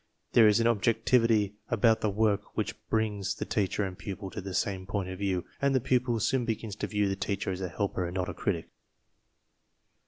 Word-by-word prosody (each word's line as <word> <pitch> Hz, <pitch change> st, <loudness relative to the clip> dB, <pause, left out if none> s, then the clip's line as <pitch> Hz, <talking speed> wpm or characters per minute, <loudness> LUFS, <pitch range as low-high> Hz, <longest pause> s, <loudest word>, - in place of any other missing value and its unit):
There 115 Hz, -2 st, +7 dB
is 105 Hz, +1 st, +4 dB
an 115 Hz, -, +2 dB
objectivity 115 Hz, -1 st, +3 dB
about 115 Hz, -1 st, +3 dB
the 105 Hz, -, +1 dB
work 105 Hz, 0 st, 0 dB
which -, -, -1 dB, 0.2 s
brings 105 Hz, -3 st, 0 dB
the -, -, -4 dB
teacher 105 Hz, 0 st, 0 dB
and 95 Hz, -2 st, -4 dB
pupil 100 Hz, 0 st, -6 dB
to -, -, -5 dB
the 95 Hz, -1 st, -5 dB
same 95 Hz, -2 st, -1 dB
point 100 Hz, -2 st, -2 dB
of 95 Hz, 0 st, -6 dB
view, 95 Hz, -3 st, -1 dB, 0.2 s
and 140 Hz, -1 st, +3 dB
the -, -, +4 dB
pupil 125 Hz, -1 st, +1 dB
soon 130 Hz, +3 st, +1 dB
begins 110 Hz, -3 st, -3 dB
to -, -, -2 dB
view 105 Hz, -1 st, +1 dB
the 95 Hz, -, 0 dB
teacher 100 Hz, -1 st, -2 dB
as 95 Hz, 0 st, -4 dB
a 90 Hz, -, -2 dB
helper 95 Hz, +1 st, -2 dB
and 90 Hz, -, -7 dB
not 90 Hz, -1 st, -1 dB
as -, -, -3 dB
a -, -, -8 dB
critic. 85 Hz, -5 st, -2 dB
105 Hz, 215 wpm, -29 LUFS, 95-115 Hz, 0.2 s, There